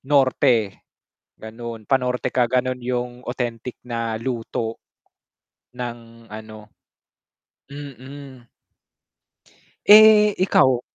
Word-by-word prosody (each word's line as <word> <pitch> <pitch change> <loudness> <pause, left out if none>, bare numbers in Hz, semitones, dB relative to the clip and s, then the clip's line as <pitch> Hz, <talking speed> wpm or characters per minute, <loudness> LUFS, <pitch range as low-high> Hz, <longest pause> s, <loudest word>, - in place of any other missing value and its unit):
norte, 130 -6 +2 0.7
ganun 115 0 -8
pa-norte 125 -2 0
ka 125 -1 +1
ganun 130 +1 -1
yung 125 0 -4
authentic 120 -1 -4
na 115 -2 -4
luto 115 -2 -4 1.0
ng 115 -2 -9
ano, 110 0 -11 1.0
mm. 135 -2 -11 1.4
Eh, 210 0 +8
ikaw? 130 -9 +3
125 Hz, 75 wpm, -22 LUFS, 115-130 Hz, 1.4 s, Eh